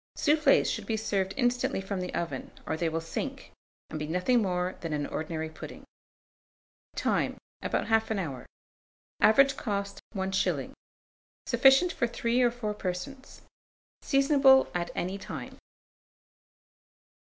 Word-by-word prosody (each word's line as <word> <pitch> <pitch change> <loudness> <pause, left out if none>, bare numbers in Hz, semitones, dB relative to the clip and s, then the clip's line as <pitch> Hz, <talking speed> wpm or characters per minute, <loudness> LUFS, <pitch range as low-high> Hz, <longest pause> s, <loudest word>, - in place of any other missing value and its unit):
Soufflés 305 +1 +4
should - - -2
be 225 - 0
served 195 -3 -1
instantly 245 -5 +1
from 195 -1 -4
the 180 - -4
oven, 170 - -3 0.2
or 160 - -1
they 165 +1 0
will 160 +1 -2
sink, 165 0 -5 0.4
and 155 - -4
be 150 - -3
nothing 180 +9 +2
more 180 -2 -1
than 165 -2 -3
an 145 -1 -1
ordinary 160 +1 -4
pudding. 160 - -10 1.1
Time. - - 0 0.2
About - - -1
1/2 225 -1 +1
hour. 140 -10 -5 0.7
Average 275 +5 +5
cost, 200 -2 -3
1s. 190 0 -1 0.7
Sufficient 270 +7 +5
for 240 - 0
3 235 +1 0
or 245 - +5
4 235 -3 -4
persons. 210 +8 -6 0.6
Seasonable 275 -1 +5
at 175 -1 -2
any 190 +3 -3
time. - - -8
200 Hz, 130 wpm, -29 LUFS, 180-245 Hz, 1.1 s, Average